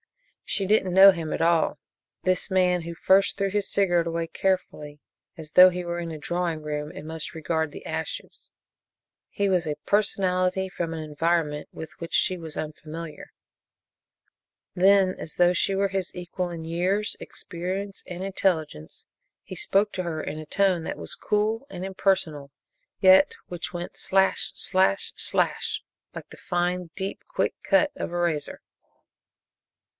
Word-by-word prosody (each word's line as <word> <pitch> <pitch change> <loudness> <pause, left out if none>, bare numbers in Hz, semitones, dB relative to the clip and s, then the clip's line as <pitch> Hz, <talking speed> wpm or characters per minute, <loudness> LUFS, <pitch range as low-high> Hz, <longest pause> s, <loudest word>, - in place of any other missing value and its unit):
She 195 - -1
didn't 195 -3 +2
know 195 +1 +10
him 165 -4 -5
at - - -2
all 165 -1 +2 0.5
this 185 +1 +1
man 180 -1 +3
who 170 +1 -6
first 195 +4 +3
threw 195 -1 0
his 205 0 -1
cigarette 175 -4 +2
away 165 0 -2
carefully, 150 -6 -2 0.4
as 155 -2 -9
though 185 +2 +9
he 180 0 -5
were 170 0 -3
in 170 -1 -4
a 155 - -6
drawing 170 +1 -2
room 150 0 -4
and 165 -4 -9
must 160 0 -5
regard 160 -1 -1
the - - -10
ashes - - -5 0.8
he 200 - 0
was 185 -3 +2
a 150 - -2
personality 190 -2 +1
from 170 -3 -4
an 160 -1 -4
environment 155 0 -1
with 160 -1 -8
which 170 - -7
she 185 - +3
was 160 -3 -7
unfamiliar. 155 +1 -7 1.4
Then, 190 0 +4
as 155 - -6
though 175 0 +4
she 190 +2 +1
were 200 +1 +2
his 190 -1 -3
equal 180 0 -4
in 165 -2 -6
years, 185 +6 0
experience 190 +3 -5
and 180 -1 -6
intelligence, 165 - -2 0.4
he 185 - -8
spoke 200 +4 +1
to 185 - -2
her 160 -3 -3
in 155 - -5
a 155 - -7
tone 185 -1 +2
that - - -4
was - - -5
cool 215 +4 0
and 180 -6 -6
impersonal, 170 -7 -1 0.5
yet 190 0 +6
which 175 -1 -5
went 175 0 -6
slash! 190 0 +2
slash! 185 - +2
slash! - - 0 0.3
like - - -9
the - - -13
fine, 175 0 -1
deep, 195 0 -4
quick - - 0
cut 295 0 +3
of - - -4
a 175 - -3
razor. 170 -4 -1
175 Hz, 160 wpm, -26 LUFS, 165-190 Hz, 1.4 s, know